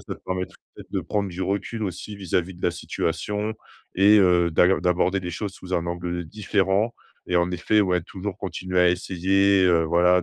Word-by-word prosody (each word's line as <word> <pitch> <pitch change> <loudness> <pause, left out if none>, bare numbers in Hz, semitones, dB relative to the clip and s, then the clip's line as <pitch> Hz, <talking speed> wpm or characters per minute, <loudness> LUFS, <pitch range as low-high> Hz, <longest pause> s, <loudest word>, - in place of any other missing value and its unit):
ça - - -7
te - - -26
permettrait 95 0 -4 0.3
de - - -1
prendre 100 -2 -2
du 90 +1 -7
recul 100 +3 -2
aussi 100 +3 -6
vis-à-vis 90 -1 -2
de 90 - -16
la 85 - +1
situation 105 +5 -3 0.4
et 105 +3 +6
heu, 90 -3 +4
d'aill 90 +1 +3
d'aborder 90 +2 +1
des 90 -1 -5
choses 95 +3 -4
sous 95 0 -10
un 85 0 -1
angle, 85 0 -4
heu, - - -11
différent 100 +3 0 0.4
et 90 - +1
en 85 +1 +2
effet, 90 +4 +2
ouais, 90 -3 +2
toujours 95 +2 -6
continuer 90 -1 -3
à 90 - +5
essayer, 95 +2 +2
heu, 85 -2 +4
voilà, 90 +2 +3
90 Hz, 195 wpm, -24 LUFS, 90-100 Hz, 0.4 s, et